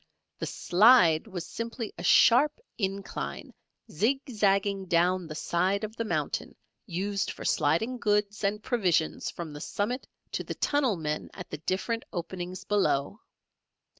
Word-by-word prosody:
The - - -3
"slide" 180 -4 +5
was 185 -5 -5
simply 230 -1 -5
a - - -8
sharp 285 - +5 0.2
incline 195 - -4 0.4
zigzagging 200 - +1
down 175 +1 +2
the 155 - -7
side 185 +6 0
of 215 +1 -5
the 230 - -2
mountain - - -2 0.3
used 195 +2 -2
for - - -7
sliding 225 +12 +1
goods 210 -1 0
and 210 +2 0
provisions 180 -10 +1
from 165 -3 -7
the 145 - -8
summit 240 - -2 0.2
to - - -2
the - - -5
tunnel 280 -7 +1
men 150 -1 -3
at 180 - -9
the 150 - -5
different 195 +8 -2
openings 175 +1 -5
below. 200 - +1
195 Hz, 135 wpm, -28 LUFS, 175-225 Hz, 0.4 s, slide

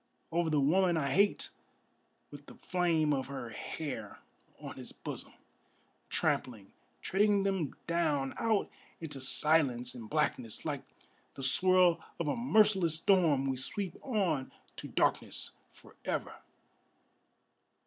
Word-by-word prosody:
Over 170 0 +1
the 150 -2 +2
woman 175 +5 +3
I 140 -3 0
hate 200 +2 +2 0.8
with 145 0 -12
the - - -12
flame 165 -4 +1
of 135 -2 -2
her 135 -4 -6
hair 120 -7 -6 0.4
on - - -8
his - - -9
bosom; - - -8 0.8
Trampling, 110 -6 -1 0.3
treading 200 +1 +2
them 190 -8 -1
down 155 -5 0
out 220 -3 +1 0.3
into 150 -5 -6
silence 135 -3 +3
and 115 -4 -9
blackness, 125 -7 -1
Like - - -2 0.5
the 135 - -7
swirl 180 +4 +4 0.2
of 170 - -1
a - - +1
merciless 210 -8 +3
storm 165 -6 +3
we 135 -1 -1
sweep 185 +7 -3
on 185 - -1 0.3
to - - -6
darkness - - 0 0.2
forever! - - -6
160 Hz, 120 wpm, -32 LUFS, 135-185 Hz, 0.8 s, swirl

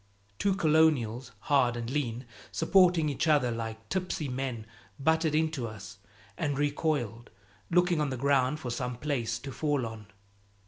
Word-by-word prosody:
Two 195 -1 +2
Colonials, 150 - +2
hard 125 -4 +2
and 115 -1 -4
lean, 125 -3 -2 0.3
supporting 180 -5 +4
each 150 +3 -1
other 145 -6 +3
like 110 -1 -5
tipsy 180 -1 -2
men, 125 -4 -3 0.3
butted 160 +2 +2
into 155 -6 0
us 100 -3 -10 0.4
and 145 -3 -1
recoiled, 145 -6 -1 0.4
looking 175 -2 +3
on 150 - 0
the 130 - -3
ground 140 +2 +2
for 125 -6 -4
some 125 +1 -3
place 125 -5 -2
to 135 +4 -8
fall 145 0 0
on. 110 -2 -8
135 Hz, 145 wpm, -29 LUFS, 120-155 Hz, 0.4 s, supporting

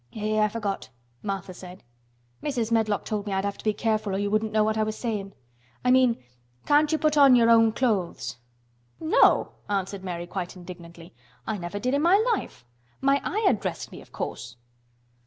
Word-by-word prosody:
"Eh! 215 0 0
I 215 - +4
forgot," 210 - -4 0.3
Martha 195 -2 -4
said. 180 +1 -11 0.6
"Mrs. 240 -6 -2
Medlock 220 -3 +1
told 210 -1 -3
me 200 - -2
I'd 190 +1 0
have 200 0 -3
to - - -11
be 215 - +2
careful 215 -2 -1
or - - 0
you 205 0 -1
wouldn't 215 0 +1
know 215 0 +3
what 215 0 +1
I 220 - +1
was 215 0 -1
sayin'. 205 -5 -4 0.5
I 250 - +4
mean 255 -2 +4 0.5
can't 295 +1 +4
you 315 - +2
put 305 -1 +1
on 275 -3 +8
your 230 -1 +5
own 225 -1 +6
clothes?" 215 - -1 0.6
"No," 320 +1 +4 0.2
answered 195 -1 -2
Mary, 175 -2 -4
quite 180 0 -5
indignantly. 175 -1 -11 0.3
"I 215 -2 -3
never 175 +3 -5
did 250 +5 -1
in 285 - +2
my 345 +5 +5 0.2
life. 125 - -5 0.3
My 275 +1 +2
Ayah 420 -4 +2
dressed 195 -5 -4
me, - - -10
of - - -18
course." - - -6
215 Hz, 190 wpm, -26 LUFS, 195-240 Hz, 0.6 s, on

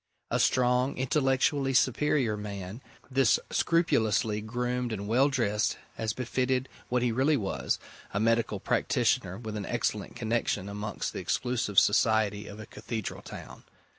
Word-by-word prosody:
A - - +1
strong, 125 +1 +2
intellectually 135 0 +1
superior 130 -2 +2
man, 100 +1 -6 0.3
this, 130 -3 +4
scrupulously 110 -10 +2
groomed 125 +2 -2
and 100 -2 -4
well 130 +6 +4
dressed, 115 -5 0 0.2
as 110 -1 -1
befitted 130 +1 -1 0.2
what 125 0 +1
he 120 - +2
really 135 +6 +3
was 100 -5 -1 0.3
a 100 - -1
medical 115 -2 +1
practitioner 90 0 +1
with 110 -2 -6
an 105 -2 -4
excellent 110 -4 -2
connection 115 -4 -1
amongst 105 +1 -4
the - - -4
exclusive 120 -5 -1
society 105 -1 +3
of 100 - -9
a 110 - -7
cathedral 110 -2 -5
town. - - -10
115 Hz, 135 wpm, -29 LUFS, 105-130 Hz, 0.3 s, this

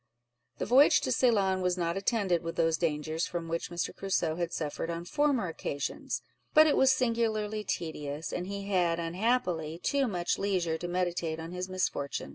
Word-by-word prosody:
The - - -2
voyage 270 +4 +6
to - - -1
Ceylon 200 -7 +3
was 180 0 +1
not 170 -1 -1
attended 195 -4 +1
with 165 -1 -5
those 165 -1 +2
dangers 155 0 -1
from 170 -1 -4
which 165 0 -3
Mr. 175 0 -3
Crusoe 175 -5 0
had 170 -1 -2
suffered 160 0 -3
on 170 0 -4
former 285 -5 +1
occasions; 145 -3 -4 0.3
but 310 0 +9
it 305 - +3
was 265 0 +5
singularly 225 -4 0
tedious, 155 -4 -4
and 180 +1 -3
he 200 0 -5
had, 175 -4 +2
unhappily, 170 -3 0
too 275 +8 +1
much 175 -5 -1
leisure 180 -5 0
to 175 - -4
meditate 175 -2 -1
on 165 +1 -6
his 180 +1 -4
misfortune. 145 - -2
180 Hz, 175 wpm, -30 LUFS, 165-210 Hz, 0.3 s, but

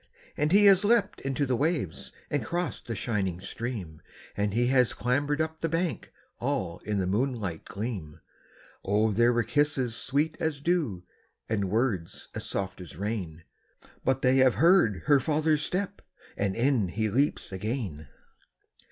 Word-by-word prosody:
And 150 +2 0
he 205 +2 +6
has 195 -1 +7
leaped 205 -2 +2
into 135 +1 -1
the 130 -1 +1
waves, 145 - -1 0.2
and 145 - 0
crossed 175 -1 -3
the 115 - -3
shining 100 -5 -2
stream, 95 -7 -6 0.3
And 105 0 0
he 120 +4 +2
has 125 -1 +3
clambered 145 +6 0
up 160 0 -2
the 165 - -1
bank, 165 +1 -2 0.3
all 120 -10 -2
in 105 -1 -3
the 95 - 0
moonlight 105 -4 -1
gleam; 100 -8 -5 0.6
Oh 105 +3 +2
there 120 +4 +4
were 120 -1 +2
kisses 140 -5 +1
sweet 145 +6 0
as 160 -3 -1
dew, 145 - 0 0.4
and 100 -4 -1
words 105 -6 -1
as - - -6
soft 95 -1 -3
as 85 -5 -10
rain, 95 -6 -4 0.6
But 135 +1 +1
they 130 +1 +4
have 130 -4 +5
heard 160 - +4
her 145 -2 +5
father's 155 +2 +1
step, 185 +5 -2 0.3
and 100 -1 -1
in 120 -4 +2
he 110 +4 -1
leaps 140 -1 0
again! 95 - -4
120 Hz, 155 wpm, -28 LUFS, 100-150 Hz, 0.6 s, has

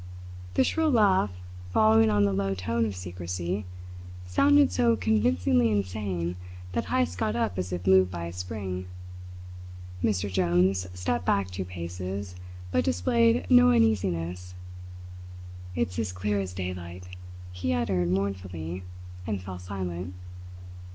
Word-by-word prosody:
The - - +5
shrill 320 -1 +1
laugh, 205 - +4 0.4
following 110 +3 +5
on 105 -1 +3
the 100 - +1
low 95 0 0
tone 115 +5 0
of 100 - -5
secrecy, 90 +1 -4 0.6
sounded 95 0 +4
so 115 +5 +3
convincingly 110 +3 +2
insane 95 -4 -2 0.3
that - - -1
Heyst 85 +2 0
got 105 - 0
up 110 -6 -1
as 90 0 -3
if 90 0 -4
moved 95 -1 +5
by 85 -2 -5
a 85 - -6
spring. 90 0 -5 1.2
Mr. 100 -2 +1
Jones 90 0 +2
stepped 90 -2 -1
back 95 -2 +1
two 95 +1 -4
paces, 90 +2 -5 0.4
but 85 - +2
displayed 105 +2 +2
no 125 +4 +7
uneasiness. 90 -6 +1 1.2
"It's 90 +3 -1
as 110 -5 -1
clear 100 +3 -1
as 95 -2 -4
daylight!" 90 -1 -6 0.4
he 90 -1 -2
uttered 85 +2 0
mournfully, 95 -3 -3 0.5
and 105 -3 -1
fell 90 0 -7
silent. 90 -1 -5
95 Hz, 130 wpm, -27 LUFS, 90-100 Hz, 1.2 s, no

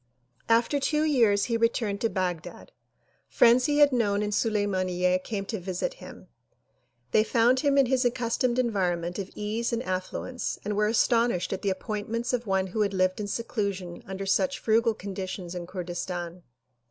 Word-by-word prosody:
After 235 +5 +3
two 300 +2 +1
years 230 -10 +3
he 230 -1 0
returned 230 -3 0
to 230 - +2
Baghdad. 180 -5 -4 0.6
Friends 240 +2 +5
he 295 0 +1
had 290 -1 +6
known 210 -5 +1
in 210 - -2
Sulimaniyye 185 -4 +1
came 200 -3 -4
to 220 0 -4
visit 180 0 -3
him. - - -11 0.8
They 215 - +4
found 235 +3 +3
him 280 0 +2
in 275 - +6
his 255 +1 +1
accustomed 240 0 0
environment 180 -7 0
of 195 -1 -4
ease 215 +3 -2
and 235 +1 -1
affluence 185 +6 -3
and 210 0 -1
were 210 +1 +2
astonished 230 -3 +2
at - - -4
the 200 - 0
appointments 215 +5 -3
of 240 -2 -1
one 190 -1 +1
who 195 +4 -3
had 200 -2 0
lived 185 +1 +1
in 210 - -3
seclusion 200 -5 -3
under 190 +1 -5
such 270 +8 +1
frugal 225 -1 +2
conditions 185 -3 -6
in 175 -1 -6
Kurdistan. 175 -1 -5
210 Hz, 165 wpm, -27 LUFS, 185-235 Hz, 0.8 s, had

